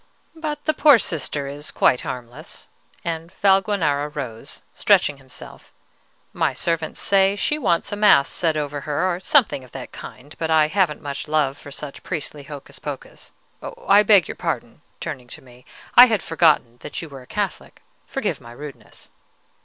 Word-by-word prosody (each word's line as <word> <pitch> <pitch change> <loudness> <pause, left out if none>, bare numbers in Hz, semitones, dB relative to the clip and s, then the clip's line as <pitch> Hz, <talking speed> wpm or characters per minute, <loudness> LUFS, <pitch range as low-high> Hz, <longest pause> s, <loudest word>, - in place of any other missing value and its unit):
"But 310 -2 -5
the 310 - +2
poor 295 -5 +7
Sister 150 -7 -3
is 145 +2 -7
quite 125 - +2
harmless;" 125 +5 -8 0.4
and 165 0 -4
Valguanera 190 -7 +2
rose, 130 -7 -7
stretching 145 - +3
himself. 135 -1 -12 0.6
"My - - 0
servants 165 -2 -2
say 195 0 +3
she 295 +8 0
wants 185 - +1
a - - -1
mass 205 -9 +5
said 160 -3 0
over 145 -1 -3
her, 155 +6 0
or - - -7
something 215 - +3
of 125 - -17
that - - -8
kind; 145 +4 -11
but 160 - -2
I 155 -1 +4
haven't 180 -5 0
much 140 0 -5
love 150 -3 +1
for 145 - -12
such 140 0 -8
priestly 150 -3 -5
hocus 140 0 -10
pocus, - - -8 0.6
I 200 +1 +7
beg 200 -5 +5
your - - -5
pardon" - - -4 0.2
(turning 125 -1 -6
to - - -11
me), 125 -1 -18 0.3
"I 245 +1 +10
had 220 -4 0
forgotten 155 -8 +2
that - - -6
you - - -7
were 140 -3 -11
a 125 - -16
Catholic: - - -4 0.2
forgive - - -2
my 120 0 -12
rudeness." 145 +2 -11
155 Hz, 170 wpm, -22 LUFS, 140-190 Hz, 0.6 s, I